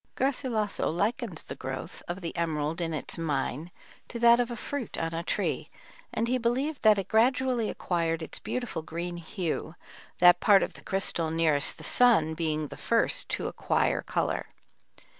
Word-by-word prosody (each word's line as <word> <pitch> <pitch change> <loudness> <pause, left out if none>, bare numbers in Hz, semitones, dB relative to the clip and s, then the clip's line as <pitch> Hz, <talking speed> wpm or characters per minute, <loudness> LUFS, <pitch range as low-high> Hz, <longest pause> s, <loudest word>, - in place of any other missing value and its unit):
Garcilasso 250 -6 0
likens 205 +1 -1
the - - -7
growth 130 0 -6
of 180 +3 -4
the 170 - -5
emerald 160 -1 -1
in 165 -1 -1
its 155 +1 -3
mine 150 0 -2 0.4
to 240 - -6
that 235 0 +6
of 245 0 +1
a 240 - -4
fruit 270 +1 -5
on 165 0 -2
a 165 - -2
tree, - - -2 0.4
and 230 - -1
he 255 +1 +1
believed 260 +6 0
that 215 -2 +6
it 195 - -2
gradually 245 0 +2
acquired 165 -2 -1
its - - -6
beautiful 245 -9 -3
green 170 +2 -5
hue, 170 -1 -4 0.4
that 175 0 +7
part 200 -2 +6
of - - -3
the - - -13
crystal 185 -4 0
nearest 160 -3 +1
the - - -11
sun 220 -11 +4
being 155 -2 -2
the - - -9
first 230 - +1
to - - -2
acquire - - 0
color. - - -1
180 Hz, 170 wpm, -28 LUFS, 165-235 Hz, 0.4 s, that